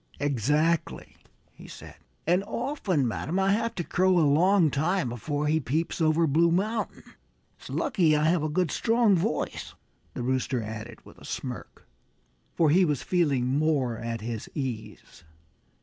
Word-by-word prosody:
"Exactly!" 145 Hz, +5 st, 0 dB, 0.4 s
he -, -, -14 dB
said. -, -, -11 dB, 0.3 s
"And 180 Hz, +4 st, +2 dB
often, 190 Hz, -, -1 dB
madam, 155 Hz, -, -3 dB
I 195 Hz, 0 st, +2 dB
have 230 Hz, +3 st, 0 dB
to 175 Hz, -, -2 dB
crow 185 Hz, +2 st, +2 dB
a 165 Hz, -, +4 dB
long 165 Hz, +3 st, +4 dB
time 170 Hz, +1 st, 0 dB
before 145 Hz, +5 st, -3 dB
he 155 Hz, +2 st, +2 dB
peeps 160 Hz, +6 st, -2 dB
over 160 Hz, +1 st, +3 dB
Blue 165 Hz, +3 st, +3 dB
Mountain. 215 Hz, +5 st, -1 dB, 0.6 s
It's -, -, -12 dB
lucky 190 Hz, -, +2 dB
I 150 Hz, -, +1 dB
have 165 Hz, +1 st, +2 dB
a 155 Hz, -, -1 dB
good, 175 Hz, +2 st, 0 dB
strong 230 Hz, -3 st, +3 dB
voice," 190 Hz, +7 st, -2 dB, 0.4 s
the 125 Hz, -, -4 dB
Rooster, 130 Hz, -1 st, -1 dB
added 110 Hz, +2 st, -8 dB
with -, -, -16 dB
a -, -, -16 dB
smirk, -, -, -7 dB, 0.7 s
for 160 Hz, -3 st, +3 dB
he 185 Hz, +4 st, +5 dB
was 150 Hz, -6 st, 0 dB
feeling 145 Hz, -9 st, +1 dB
more 145 Hz, -6 st, +1 dB
at 115 Hz, -1 st, -4 dB
his 115 Hz, -1 st, -5 dB
ease. 125 Hz, -, -6 dB
155 Hz, 155 wpm, -27 LUFS, 135-180 Hz, 0.7 s, he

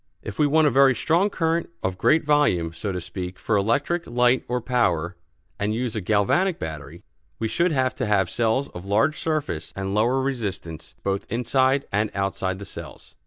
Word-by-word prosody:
If -, -, -7 dB
we 150 Hz, -, +4 dB
want 155 Hz, +2 st, +4 dB
a 150 Hz, -, +4 dB
very 135 Hz, +1 st, +5 dB
strong 170 Hz, -, +2 dB
current 165 Hz, -3 st, 0 dB
of 95 Hz, 0 st, -2 dB
great 155 Hz, 0 st, +3 dB
volume, 120 Hz, -, +2 dB
so 100 Hz, +5 st, -4 dB
to 90 Hz, -, -3 dB
speak, 90 Hz, +1 st, -6 dB
for 110 Hz, -, -1 dB
electric 140 Hz, -, 0 dB
light 125 Hz, +1 st, +2 dB
or 125 Hz, +1 st, -1 dB
power, 95 Hz, -9 st, 0 dB, 0.4 s
and 105 Hz, +2 st, 0 dB
use 120 Hz, -1 st, -2 dB
a 110 Hz, -, -2 dB
galvanic 110 Hz, -, +2 dB
battery, 80 Hz, +1 st, -7 dB, 0.3 s
we 115 Hz, -, -1 dB
should 170 Hz, +9 st, +1 dB
have 130 Hz, -3 st, +1 dB
to -, -, 0 dB
have 100 Hz, -3 st, +2 dB
cells 120 Hz, +7 st, 0 dB
of 90 Hz, -, -9 dB
large 115 Hz, +10 st, +2 dB
surface 155 Hz, -, -2 dB
and 95 Hz, 0 st, -3 dB
lower 120 Hz, +5 st, +2 dB
resistance 105 Hz, -, -4 dB
both 100 Hz, 0 st, -2 dB
inside 130 Hz, +3 st, +2 dB
and 105 Hz, +2 st, +1 dB
outside 95 Hz, -1 st, -1 dB
the 100 Hz, -, -8 dB
cells. -, -, -10 dB
115 Hz, 185 wpm, -24 LUFS, 95-140 Hz, 0.4 s, very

